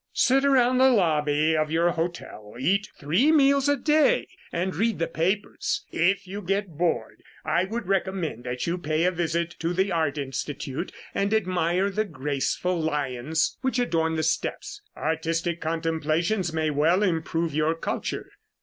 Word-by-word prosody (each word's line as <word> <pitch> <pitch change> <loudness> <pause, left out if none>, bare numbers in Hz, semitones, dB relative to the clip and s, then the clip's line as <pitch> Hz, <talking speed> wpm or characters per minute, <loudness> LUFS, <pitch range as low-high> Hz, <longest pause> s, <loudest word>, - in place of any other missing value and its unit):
"Sit 270 +2 +3
around 255 -2 +4
the 265 +1 +6
lobby 155 - +2
of 155 -1 +1
your 165 +2 +2
hotel, 165 -11 -5
eat 195 +10 +1
three 180 - +2
meals 280 -2 +4
a 285 - +3
day, 310 - +3 0.2
and 180 +2 -2
read 225 +5 +1
the 165 - 0
papers. 180 +6 -1
If 195 +4 +1
you 200 +3 -6
get 195 +1 -1
bored, 170 +2 -1 0.2
I 170 +4 +2
would 225 +2 -4
recommend 190 - -1
that 125 0 -3
you 175 +2 -1
pay 155 0 0
a 180 - +3
visit 170 -1 -1
to 165 +1 -1
the 190 +2 +1
Art 160 -4 0
Institute 135 +3 -4 0.2
and 200 +1 0
admire 185 -1 +1
the 215 +3 0
graceful 155 +2 -2
lions 150 0 -1
which 260 0 0
adorn 165 -9 +1
the 160 - -1
steps. 410 - -2 0.2
Artistic 165 +2 -1
contemplations 165 +3 0
may 160 -1 0
well 160 +7 +3
improve 165 -3 -1
your 155 +2 +1
culture." 165 - -4
170 Hz, 155 wpm, -25 LUFS, 155-200 Hz, 0.2 s, the